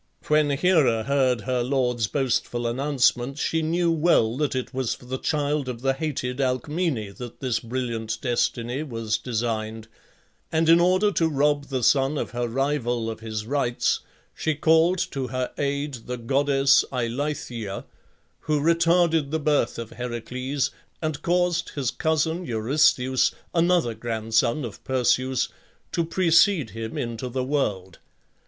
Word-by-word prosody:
When 150 Hz, -1 st, +4 dB
Hera 140 Hz, -7 st, +3 dB
heard 130 Hz, -2 st, +1 dB
her 125 Hz, +1 st, -1 dB
lord's 125 Hz, -3 st, 0 dB
boastful 120 Hz, -2 st, -1 dB
announcement 130 Hz, +1 st, +1 dB
she 160 Hz, +1 st, 0 dB
knew 170 Hz, +2 st, +1 dB
well 150 Hz, -8 st, +3 dB
that 150 Hz, -2 st, 0 dB
it 130 Hz, +1 st, -3 dB
was 130 Hz, -3 st, -1 dB
for -, -, -16 dB
the 130 Hz, +1 st, -4 dB
child 145 Hz, -2 st, -1 dB
of 120 Hz, -2 st, -6 dB
the 135 Hz, 0 st, +2 dB
hated 135 Hz, -3 st, -3 dB
Alcmene 130 Hz, -, -1 dB
that 120 Hz, -2 st, -8 dB
this 125 Hz, -4 st, 0 dB
brilliant 115 Hz, -2 st, -3 dB
destiny 120 Hz, +1 st, -1 dB
was 115 Hz, -6 st, -2 dB
designed; 110 Hz, -2 st, -3 dB, 0.6 s
and 160 Hz, 0 st, +2 dB
in 165 Hz, +1 st, +7 dB
order 185 Hz, +4 st, +3 dB
to 165 Hz, -4 st, +2 dB
rob 145 Hz, 0 st, +1 dB
the 130 Hz, -3 st, -3 dB
son 135 Hz, +3 st, +3 dB
of -, -, -3 dB
her 120 Hz, 0 st, -2 dB
rival 120 Hz, -3 st, -1 dB
of 110 Hz, -, -8 dB
his 110 Hz, -1 st, -5 dB
rights, 120 Hz, -1 st, 0 dB, 0.3 s
she 155 Hz, -1 st, -1 dB
called 160 Hz, +4 st, +4 dB
to 135 Hz, -2 st, -3 dB
her 130 Hz, 0 st, -3 dB
aid 140 Hz, +1 st, -1 dB
the 125 Hz, 0 st, -3 dB
goddess 135 Hz, +2 st, +3 dB
Eilithyia, 120 Hz, -4 st, -3 dB, 0.5 s
who 150 Hz, -1 st, 0 dB
retarded 165 Hz, -1 st, +3 dB
the 160 Hz, +2 st, -1 dB
birth 150 Hz, -1 st, +1 dB
of 115 Hz, -1 st, -6 dB
Heracles, 125 Hz, +3 st, -3 dB, 0.3 s
and 155 Hz, -3 st, -3 dB
caused 175 Hz, 0 st, +1 dB
his 135 Hz, -4 st, -1 dB
cousin 160 Hz, +2 st, 0 dB
Eurystheus 130 Hz, 0 st, +2 dB, 0.2 s
(another 170 Hz, -7 st, +2 dB
grandson 115 Hz, +4 st, 0 dB
of 110 Hz, -, -9 dB
Perseus) 130 Hz, 0 st, +1 dB, 0.4 s
to 170 Hz, -, 0 dB
precede 170 Hz, -, +3 dB
him 110 Hz, +1 st, -6 dB
into 115 Hz, +1 st, -3 dB
the 130 Hz, +1 st, -2 dB
world. 105 Hz, -, -2 dB
130 Hz, 145 wpm, -25 LUFS, 120-150 Hz, 0.6 s, in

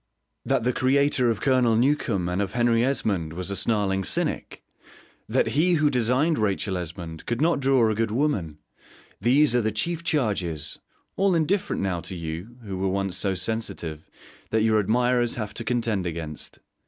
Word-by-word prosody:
That -, -, +1 dB
the 125 Hz, +1 st, +1 dB
creator 130 Hz, -1 st, +2 dB
of 115 Hz, -, -1 dB
Colonel 130 Hz, -4 st, +3 dB
Newcome 115 Hz, -, +1 dB
and 90 Hz, +3 st, -1 dB
of 100 Hz, 0 st, -3 dB
Henry 120 Hz, -1 st, +3 dB
Esmond 100 Hz, -, -1 dB
was 90 Hz, +3 st, -4 dB
a -, -, -2 dB
snarling 100 Hz, -3 st, +1 dB
cynic; -, -, -3 dB, 0.7 s
that -, -, +2 dB
he 175 Hz, +5 st, +2 dB
who 155 Hz, -3 st, +3 dB
designed 125 Hz, +5 st, +2 dB
Rachel 100 Hz, -2 st, 0 dB
Esmond 85 Hz, -2 st, -6 dB
could 120 Hz, 0 st, -1 dB
not 165 Hz, 0 st, +2 dB
draw 135 Hz, -4 st, +3 dB
a 110 Hz, -, +1 dB
good 115 Hz, +1 st, 0 dB
woman: 105 Hz, -, -1 dB, 0.6 s
these 130 Hz, +5 st, +4 dB
are 120 Hz, -, +4 dB
the 110 Hz, 0 st, 0 dB
chief 170 Hz, +11 st, -1 dB
charges 100 Hz, -, -1 dB, 0.4 s
(all 195 Hz, -2 st, +3 dB
indifferent 170 Hz, -, 0 dB
now 95 Hz, -3 st, -1 dB
to 90 Hz, +3 st, -7 dB
you, 85 Hz, +8 st, -6 dB
who 95 Hz, -3 st, -5 dB
were 95 Hz, 0 st, 0 dB
once 95 Hz, -1 st, -1 dB
so 95 Hz, 0 st, 0 dB
sensitive) 90 Hz, -6 st, -4 dB, 0.4 s
that 110 Hz, 0 st, +1 dB
your 110 Hz, -1 st, +3 dB
admirers 120 Hz, +3 st, +2 dB
have 110 Hz, -3 st, -4 dB
to 115 Hz, -, -4 dB
contend 115 Hz, -6 st, -1 dB
against. 80 Hz, -2 st, -6 dB
110 Hz, 170 wpm, -25 LUFS, 95-130 Hz, 0.7 s, these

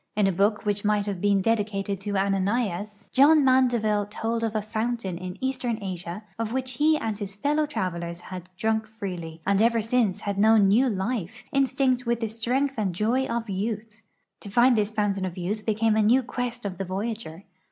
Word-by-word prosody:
In 210 Hz, -1 st, +3 dB
a 195 Hz, -, +3 dB
book 205 Hz, +4 st, +1 dB
which 205 Hz, -1 st, 0 dB
might 210 Hz, -1 st, +2 dB
have 195 Hz, -4 st, -4 dB
been 200 Hz, -1 st, +3 dB
dedicated 200 Hz, -2 st, 0 dB
to 200 Hz, 0 st, -2 dB
Ananias, 200 Hz, +1 st, -1 dB
John 290 Hz, +2 st, +6 dB
ISIandeville 235 Hz, -6 st, +3 dB
told 230 Hz, +2 st, -2 dB
of 225 Hz, -1 st, -1 dB
a 215 Hz, -, +1 dB
fountain 220 Hz, -3 st, -2 dB
in 180 Hz, +1 st, -6 dB
eastern 255 Hz, -3 st, -1 dB
Asia 180 Hz, 0 st, -5 dB, 0.2 s
of 225 Hz, -1 st, -2 dB
Avhich 260 Hz, -1 st, -3 dB
he 310 Hz, +2 st, +4 dB
and 220 Hz, -7 st, -2 dB
his 200 Hz, -1 st, -6 dB
fellow 295 Hz, +6 st, +1 dB
travelers 170 Hz, -, -3 dB
had 180 Hz, 0 st, -8 dB
drunk 220 Hz, 0 st, 0 dB
freely, 180 Hz, -7 st, -6 dB
and 200 Hz, +1 st, +3 dB
ever 230 Hz, 0 st, +4 dB
since 225 Hz, -3 st, +1 dB
had 200 Hz, -1 st, -3 dB
known 215 Hz, -1 st, +6 dB
new 245 Hz, +6 st, +4 dB
life, 195 Hz, -2 st, -3 dB
instinct 265 Hz, -2 st, +1 dB
with 235 Hz, 0 st, +1 dB
the 225 Hz, -2 st, -2 dB
strength 250 Hz, +4 st, -1 dB
and 190 Hz, -5 st, -1 dB
joy 240 Hz, +7 st, +1 dB
of 235 Hz, 0 st, -2 dB
youth. 210 Hz, +2 st, -4 dB, 0.4 s
J'o 200 Hz, -, -8 dB
find 240 Hz, +5 st, +5 dB
this 210 Hz, -2 st, +1 dB
fountain 205 Hz, -3 st, -1 dB
of 185 Hz, -1 st, -4 dB
youth 205 Hz, +5 st, -3 dB
became 220 Hz, 0 st, +2 dB
a 220 Hz, -, +3 dB
new 240 Hz, +5 st, +4 dB
quest 245 Hz, -1 st, -4 dB
of 185 Hz, -3 st, -4 dB
the 195 Hz, -, -2 dB
voyager. 195 Hz, -2 st, -4 dB
215 Hz, 195 wpm, -26 LUFS, 195-235 Hz, 0.4 s, John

